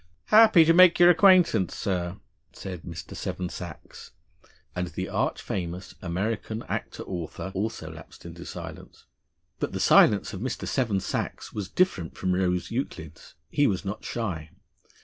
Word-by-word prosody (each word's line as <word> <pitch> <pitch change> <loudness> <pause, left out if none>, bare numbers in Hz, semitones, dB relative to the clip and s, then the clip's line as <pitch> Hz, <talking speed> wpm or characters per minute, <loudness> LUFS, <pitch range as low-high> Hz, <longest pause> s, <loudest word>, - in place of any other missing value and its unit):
"Happy 215 -7 +8
to 165 - +5
make 180 0 +7
your 175 0 +8
acquaintance, 175 - +4
sir," 90 -3 -2 0.4
said 90 -3 -7
Mr. 85 0 -8
Seven 90 -2 -4
Sachs, 85 -4 -10 0.6
and 90 0 -2
the 85 - -5
arch - - -1
famous 90 0 -5
American 105 +5 -3
actor - - -5
author 90 +1 -6
also 105 +4 -4
lapsed - - -13
into - - -9
silence. - - -9 0.5
But - - -3
the - - -3
silence 105 - +5
of 95 - -6
Mr. 130 +1 -4
Seven 115 -8 0
Sachs - - -4
was 100 -3 -4
different 95 - 0
from 95 -1 0
Rose 90 -1 0
Euclid's. 90 - -6 0.2
He 145 -1 +3
was 95 0 -2
not 100 +2 -5
shy. 90 -10 -4
95 Hz, 150 wpm, -26 LUFS, 90-125 Hz, 0.6 s, Happy